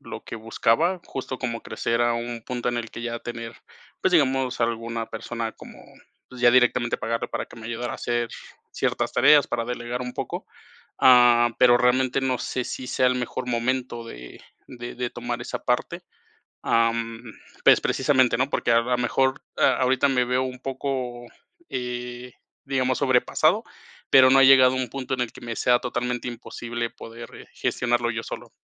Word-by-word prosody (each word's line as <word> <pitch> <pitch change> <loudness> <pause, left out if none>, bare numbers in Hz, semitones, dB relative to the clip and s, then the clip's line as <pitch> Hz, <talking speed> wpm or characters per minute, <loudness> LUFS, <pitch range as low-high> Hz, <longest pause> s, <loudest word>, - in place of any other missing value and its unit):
lo - - -9
que - - -7
buscaba, 115 +10 +1
justo 130 -1 -5
como 115 -3 -4
crecer 115 +1 -1
a 120 0 +2
un 120 0 -4
punto 125 +1 -3
en 120 - -1
el 115 -1 -4
que - - -8
ya 120 0 -3
tener, 115 -1 -7 0.5
pues, - - +2
digamos, 135 -6 +2
alguna 115 0 -2
persona 115 0 -5
como, - - -14 0.5
pues, 125 -1 -11
ya 120 - +7
directamente 125 -1 +3
pagarle 115 0 -2
para - - -4
que - - -15
me 115 - -11
ayudara 120 +1 -4
a - - -4
hacer 120 -1 -1 0.4
ciertas - - -1
tareas, 150 -2 +6
para 115 - -2
delegar 120 +1 -4
un 125 0 -5
poco, - - -5 0.5
ah, 120 -2 +6
pero, 125 -1 +6
realmente 130 +2 +2
no 130 -1 0
sé 125 - -3
si 130 - -6
sea 130 - +1
el 125 - +3
mejor 125 0 -4
momento 120 0 -2
de 60 - -11 0.3
de 120 -1 -8
de 125 -1 -3
tomar 120 0 -5
esa 120 - -4
parte, 170 +8 -1 0.6
am, 115 0 0 0.4
pues, - - +7
precisamente, 130 -3 +2
¿no? 130 +2 +1
Porque - - -1
a 115 - +5
lo 125 +1 0
mejor 130 +2 +1 0.2
a - - +3
ahorita 130 +2 +3
me 130 -2 +2
veo 125 +1 +1
un 130 -1 -6
poco, 130 -2 -4 0.4
eh, 125 0 -5 0.3
digamos 130 -2 0
sobrepasado, 130 -3 +2 0.5
pero 130 -1 +8
no 135 - +5
ha - - +7
llegado 130 -1 +7
a - - -2
un 130 -1 -1
punto 135 +1 -5
en 125 - -3
el 120 - -2
que - - -14
me 120 -1 -5
sea 120 +1 +3
totalmente 125 0 -3
imposible 120 0 -5
poder, 115 +1 -10
eh, - - -12
gestionarlo 120 -1 0
yo 115 -1 -3
solo. - - -8
125 Hz, 180 wpm, -24 LUFS, 120-130 Hz, 0.6 s, pero